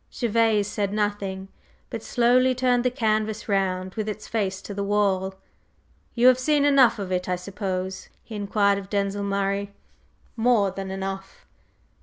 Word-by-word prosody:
Gervase 225 Hz, -3 st, +1 dB
said 205 Hz, -1 st, -2 dB
nothing, 205 Hz, -2 st, -2 dB, 0.4 s
but -, -, -4 dB
slowly 255 Hz, +1 st, +3 dB
turned 250 Hz, -1 st, +2 dB
the 250 Hz, -, +3 dB
canvas 215 Hz, -2 st, -1 dB
round 185 Hz, -2 st, 0 dB
with 215 Hz, -1 st, -3 dB
its 210 Hz, 0 st, -6 dB
face 195 Hz, -4 st, -1 dB
to 205 Hz, -, -7 dB
the 200 Hz, 0 st, -3 dB
wall. 195 Hz, -2 st, +1 dB, 0.8 s
"You 240 Hz, 0 st, +2 dB
have 255 Hz, 0 st, +7 dB
seen 290 Hz, +2 st, +2 dB
enough 265 Hz, -5 st, +5 dB
of 195 Hz, -3 st, -5 dB
it, 180 Hz, 0 st, -1 dB
I 180 Hz, -, +1 dB
suppose?" 190 Hz, 0 st, -4 dB
he 225 Hz, -, -11 dB
inquired 200 Hz, -1 st, +1 dB
of 195 Hz, -1 st, -11 dB
Denzil 200 Hz, 0 st, -1 dB
Murray. 200 Hz, 0 st, -1 dB, 0.6 s
"More 225 Hz, -4 st, +3 dB
than 195 Hz, 0 st, -6 dB
enough!" 195 Hz, 0 st, -6 dB
205 Hz, 155 wpm, -25 LUFS, 195-230 Hz, 0.8 s, have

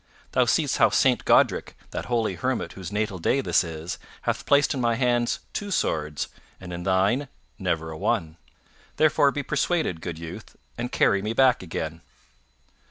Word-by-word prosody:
Thou -, -, +3 dB
seest -, -, +1 dB
how -, -, +6 dB
Saint -, -, +2 dB
Godrick, -, -, +3 dB, 0.2 s
that -, -, -4 dB
holy 115 Hz, -5 st, 0 dB
hermit 125 Hz, +8 st, -2 dB
whose 95 Hz, -2 st, -7 dB
natal 105 Hz, -3 st, -2 dB
day 135 Hz, -, +2 dB
this 135 Hz, -, +2 dB
is, 80 Hz, 0 st, -6 dB, 0.2 s
hath -, -, -2 dB
placed 145 Hz, +1 st, +4 dB
in 135 Hz, -, -2 dB
my 120 Hz, -1 st, +2 dB
hands 120 Hz, -1 st, +1 dB
two 205 Hz, -, -4 dB
swords 75 Hz, -, -1 dB, 0.3 s
and 90 Hz, -1 st, -8 dB
in 85 Hz, -, -5 dB
thine 95 Hz, +9 st, +2 dB, 0.3 s
never 80 Hz, 0 st, -1 dB
a 80 Hz, -, -7 dB
one. 80 Hz, 0 st, -1 dB, 0.6 s
Therefore 150 Hz, -2 st, +4 dB
be 145 Hz, +1 st, -3 dB
persuaded, 155 Hz, -, 0 dB
good 85 Hz, -2 st, -5 dB
youth, 85 Hz, 0 st, -9 dB, 0.2 s
and 120 Hz, +1 st, -4 dB
carry 100 Hz, -, +3 dB
me 105 Hz, +2 st, -2 dB
back 130 Hz, 0 st, +4 dB
again." 80 Hz, -2 st, -5 dB
100 Hz, 165 wpm, -25 LUFS, 85-130 Hz, 0.6 s, how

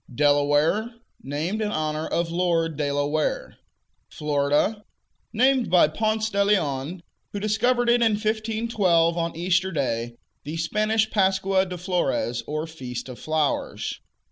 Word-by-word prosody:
Delaware 145 Hz, -, +2 dB, 0.3 s
Named 160 Hz, +10 st, -3 dB
in 210 Hz, -1 st, -1 dB
honor 155 Hz, -2 st, -2 dB
of 170 Hz, -1 st, -1 dB
Lord 170 Hz, -2 st, 0 dB
De 145 Hz, -1 st, -1 dB
La 145 Hz, 0 st, 0 dB
Ware. 155 Hz, +1 st, -2 dB, 0.5 s
Florida 150 Hz, +8 st, 0 dB, 0.5 s
Named 255 Hz, +2 st, +2 dB
by 180 Hz, -4 st, +5 dB
Ponce 215 Hz, +5 st, -1 dB
de 200 Hz, 0 st, +2 dB
Leon, 165 Hz, -4 st, 0 dB, 0.3 s
who 205 Hz, -, -3 dB
discovered 240 Hz, +4 st, +1 dB
it 240 Hz, 0 st, +4 dB
in 225 Hz, -2 st, +4 dB
1512, 215 Hz, -5 st, +1 dB
on 170 Hz, -1 st, -2 dB
Easter 180 Hz, +2 st, +1 dB
Day, 120 Hz, -6 st, -2 dB, 0.3 s
the 155 Hz, +3 st, -5 dB
Spanish 215 Hz, +6 st, +1 dB
Pascua 190 Hz, -1 st, +2 dB
de 180 Hz, 0 st, -6 dB
Flores, 170 Hz, -, -1 dB
or 155 Hz, +1 st, -2 dB
"Feast 130 Hz, -6 st, -7 dB
of 125 Hz, -, -9 dB
Flowers." 155 Hz, -2 st, -2 dB
175 Hz, 135 wpm, -24 LUFS, 150-215 Hz, 0.5 s, by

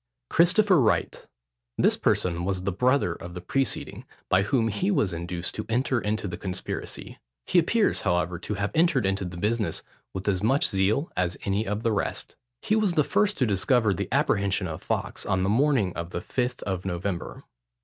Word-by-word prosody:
CHRISTOPHER 180 Hz, 0 st, +5 dB
WRIGHT. 110 Hz, -, 0 dB, 0.5 s
This -, -, +4 dB
person 85 Hz, -1 st, 0 dB
was 95 Hz, 0 st, -1 dB
the 100 Hz, -, 0 dB
brother 125 Hz, -2 st, +2 dB
of 85 Hz, +1 st, -9 dB
the -, -, -4 dB
preceding, 135 Hz, +10 st, -2 dB, 0.3 s
by 95 Hz, -, +4 dB
whom 115 Hz, +2 st, +1 dB
he 180 Hz, -, -1 dB
was 140 Hz, -, +1 dB
induced 85 Hz, +1 st, -3 dB
to -, -, -5 dB
enter 125 Hz, +1 st, +1 dB
into 105 Hz, 0 st, -2 dB
the 90 Hz, -, -5 dB
conspiracy. 95 Hz, -1 st, -5 dB, 0.3 s
He 180 Hz, -, +4 dB
appears, 210 Hz, +6 st, +2 dB
however, 90 Hz, -2 st, 0 dB
to 105 Hz, -, -4 dB
have 100 Hz, +1 st, -2 dB
entered 155 Hz, -, +3 dB
into 95 Hz, 0 st, 0 dB
the 90 Hz, -1 st, -7 dB
business 105 Hz, +3 st, -1 dB, 0.3 s
with 95 Hz, -, -6 dB
as 95 Hz, -3 st, +1 dB
much 135 Hz, +7 st, +3 dB
zeal 105 Hz, -, +1 dB
as 90 Hz, -1 st, 0 dB
any 100 Hz, +2 st, 0 dB
of 105 Hz, +3 st, -2 dB
the 115 Hz, -, +2 dB
rest. 105 Hz, -, -2 dB, 0.3 s
He 215 Hz, -, +2 dB
was 210 Hz, -5 st, +2 dB
the 150 Hz, -, +4 dB
first 210 Hz, +7 st, +1 dB
to 130 Hz, -, +2 dB
discover 110 Hz, +1 st, +2 dB
the -, -, -4 dB
apprehension 100 Hz, -1 st, +1 dB
of 80 Hz, -1 st, -6 dB
Fawkes, -, -, -2 dB
on 95 Hz, 0 st, 0 dB
the 95 Hz, -, +1 dB
morning 120 Hz, -5 st, +2 dB
of 85 Hz, 0 st, -4 dB
the -, -, -4 dB
Fifth 125 Hz, -1 st, -2 dB
of 95 Hz, -2 st, -3 dB
November. 90 Hz, -8 st, -4 dB
100 Hz, 190 wpm, -26 LUFS, 90-130 Hz, 0.5 s, CHRISTOPHER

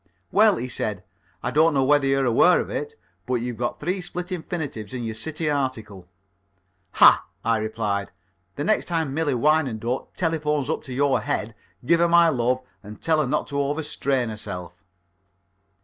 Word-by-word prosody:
"Well," 215 Hz, -1 st, +5 dB
he 125 Hz, -, -4 dB
said, 105 Hz, -6 st, -3 dB, 0.4 s
"I -, -, -1 dB
don't 160 Hz, +1 st, +3 dB
know 135 Hz, -, +3 dB
whether 145 Hz, 0 st, +3 dB
you're 135 Hz, 0 st, +2 dB
aware 125 Hz, +9 st, +5 dB
of -, -, -4 dB
it, 450 Hz, +1 st, -4 dB, 0.3 s
but 125 Hz, -, 0 dB
you've 120 Hz, -1 st, -3 dB
got 120 Hz, -, -3 dB
three 180 Hz, +5 st, -2 dB
split 180 Hz, +1 st, -6 dB
infinitives 155 Hz, -, -5 dB
in 120 Hz, -, -4 dB
your 110 Hz, -1 st, -3 dB
City 155 Hz, +8 st, -2 dB
article." 115 Hz, -10 st, -3 dB, 0.9 s
"Ah!" -, -, +6 dB, 0.2 s
I 115 Hz, 0 st, +2 dB
replied. 110 Hz, -2 st, -2 dB, 0.4 s
"The 145 Hz, -, -3 dB
next 215 Hz, -, +1 dB
time 160 Hz, -5 st, -1 dB
Millie 150 Hz, -3 st, 0 dB
Wyandotte 130 Hz, -4 st, 0 dB
telephones 150 Hz, -4 st, 0 dB
up -, -, -2 dB
to 130 Hz, -, -9 dB
your 140 Hz, 0 st, +2 dB
head, 110 Hz, +1 st, -2 dB, 0.3 s
give 170 Hz, +5 st, +4 dB
her 170 Hz, -, +4 dB
my 170 Hz, 0 st, +6 dB
love 125 Hz, -2 st, 0 dB, 0.2 s
and 105 Hz, +1 st, -11 dB
tell 160 Hz, -1 st, +1 dB
her 145 Hz, -, -1 dB
not -, -, 0 dB
to 140 Hz, -1 st, -1 dB
over 145 Hz, +3 st, -1 dB
strain 135 Hz, -4 st, -1 dB
herself." 90 Hz, -5 st, -6 dB
135 Hz, 175 wpm, -24 LUFS, 115-160 Hz, 0.9 s, Ah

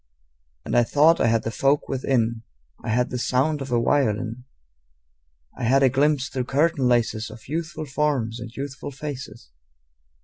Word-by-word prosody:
And -, -, -2 dB
I 120 Hz, -, +6 dB
thought 155 Hz, +7 st, +4 dB
I -, -, +4 dB
had 115 Hz, -1 st, +2 dB
the 115 Hz, -, -3 dB
folk 140 Hz, +4 st, +1 dB
within: 120 Hz, -4 st, 0 dB, 0.4 s
I -, -, -4 dB
had 125 Hz, +3 st, +1 dB
the 125 Hz, -, -2 dB
sound 140 Hz, +5 st, +1 dB
of 135 Hz, -1 st, -6 dB
a 120 Hz, -, +3 dB
violin; 115 Hz, -1 st, 0 dB, 1.1 s
I 125 Hz, -, -4 dB
had 135 Hz, +4 st, +4 dB
a 130 Hz, -, +6 dB
glimpse 140 Hz, +1 st, +2 dB
through 130 Hz, -2 st, -3 dB
curtain 145 Hz, 0 st, +1 dB
laces 115 Hz, -2 st, +1 dB
Of 110 Hz, 0 st, -13 dB
youthful 160 Hz, +1 st, -4 dB
forms 135 Hz, -5 st, -1 dB
and 115 Hz, 0 st, -7 dB
youthful 140 Hz, +2 st, -6 dB
faces. 135 Hz, -, -8 dB
130 Hz, 165 wpm, -24 LUFS, 115-145 Hz, 1.1 s, I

